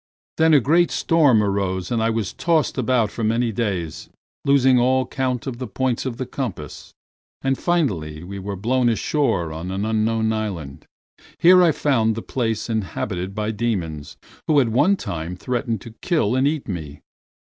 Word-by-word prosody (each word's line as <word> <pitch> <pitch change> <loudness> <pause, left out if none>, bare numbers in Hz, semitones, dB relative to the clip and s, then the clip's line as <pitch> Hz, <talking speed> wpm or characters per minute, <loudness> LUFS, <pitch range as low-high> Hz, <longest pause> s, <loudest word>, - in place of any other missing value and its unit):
Then 160 -1 +5
a - - +7
great 165 +7 +3
storm 145 -10 +3
arose 95 -2 -1
and 115 -2 +1
I 115 - +2
was 110 -3 -2
tossed 165 -3 +1
about 120 -3 +1
for 115 - -5
many 115 +2 +1
days, 95 -8 -3 0.3
losing 130 -2 +4
all 130 +1 +2
count 130 -2 -2
of 125 -3 -5
the 130 - -4
points 130 +4 -1
of 120 -3 -4
the 130 - -3
compass, 100 - -6 0.5
and 135 0 +1
finally 95 - -1
we 100 +2 -7
were 100 +1 -5
blown 120 +5 +1
ashore 115 - 0
on 80 +3 -6
an 95 +2 -2
unknown 110 0 +1
island. 90 -11 -5 0.5
Here 180 +2 +7
I 170 -2 +5
found 115 -7 +1
the 115 - -5
place 115 -4 -2
inhabited 95 -3 -3
by 105 0 -1
demons 95 -10 -3 0.3
who 150 -2 +4
at 125 -4 +2
one 145 - +3
time 85 - -5
threatened 115 0 -2
to 115 - -11
kill 155 - +1
and 130 +2 +3
eat 150 -1 -2
me. 80 -7 -6
115 Hz, 170 wpm, -22 LUFS, 100-130 Hz, 0.5 s, a